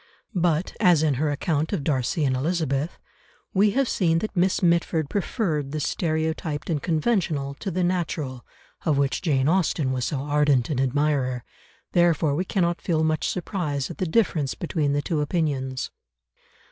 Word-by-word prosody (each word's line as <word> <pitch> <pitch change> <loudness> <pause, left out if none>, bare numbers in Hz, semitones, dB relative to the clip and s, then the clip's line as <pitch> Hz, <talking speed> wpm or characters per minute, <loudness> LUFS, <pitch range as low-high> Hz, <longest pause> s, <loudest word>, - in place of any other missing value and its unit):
But, 175 -2 0
as 175 -7 +5
in 155 -2 +3
her 155 - +2
account 150 +1 -1
of 145 - -1
Darcy 140 +2 0
and 130 -1 +1
Elizabeth, 150 0 -1 0.6
we 200 +2 +4
have 275 -2 +3
seen 165 -7 +2
that 210 +5 -3
Miss 185 +1 +2
Mitford 170 -3 +2
preferred 170 - -1
the 155 - -1
stereotyped 160 0 -1
and 150 -3 0
conventional 160 -5 0
to - - -3
the 185 0 -1
natural, 160 -8 -2 0.4
of 155 -4 +2
which 140 -1 +1
Jane 140 -5 +1
Austen 160 -5 +1
was 130 -2 -1
so 140 -3 -2
ardent 145 -3 +2
an 135 - 0
admirer, 135 -2 +1 0.5
therefore 165 -4 +3
we 175 +6 -1
cannot 175 -3 0
feel 160 -3 +1
much 155 0 +1
surprise 165 -7 -2
at - - -10
the 185 - 0
difference 160 - +1
between 155 -4 -1
the 145 0 0
two 160 -4 -1
opinions. 140 -5 -1
155 Hz, 160 wpm, -25 LUFS, 140-175 Hz, 0.6 s, as